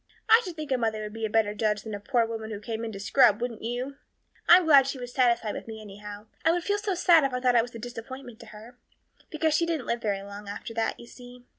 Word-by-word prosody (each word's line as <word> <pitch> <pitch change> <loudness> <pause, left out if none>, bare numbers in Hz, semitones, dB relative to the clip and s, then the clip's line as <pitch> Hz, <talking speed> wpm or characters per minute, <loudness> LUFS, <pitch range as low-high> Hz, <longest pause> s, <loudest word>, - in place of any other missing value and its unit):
I 450 +2 +7
should 360 -5 -7
think 305 -3 -7
a 260 - +2
mother 220 -2 -1
would 210 0 -7
be 225 0 -3
a - - -10
better 210 -1 +2
judge 210 -1 -1
than 220 - -7
a 205 - -4
poor 235 +2 +1
woman 225 -1 -6
who 210 -2 -5
came 225 +1 -5
in 225 - -4
to 195 - -7
scrub, 210 0 +4
wouldn't 240 -1 -4
you? 245 +4 -4 0.5
I'm 350 +1 +8
glad 280 -4 +6
she 270 - -3
was 245 -1 -8
satisfied 235 -4 +2
with - - -7
me 220 -1 -7
anyhow, 205 0 -10 0.2
I 325 - +4
would 350 0 -1
feel 410 +2 0
so 410 -2 -2
sad 340 -3 +5
if 270 -2 0
I - - -1
thought 250 -1 +2
I 235 - +6
was 240 +1 -8
a - - -5
disappointment 245 +1 -9
to - - -12
her 225 +4 -13 0.5
because 315 0 0
she 335 +2 +2
didn't 320 -6 -2
live 235 0 -2
very 200 -3 -2
long 200 +1 -10
after 210 +3 -7
that, 225 0 -2
you - - -11
see. 245 0 -14
235 Hz, 275 wpm, -27 LUFS, 215-275 Hz, 0.5 s, I'm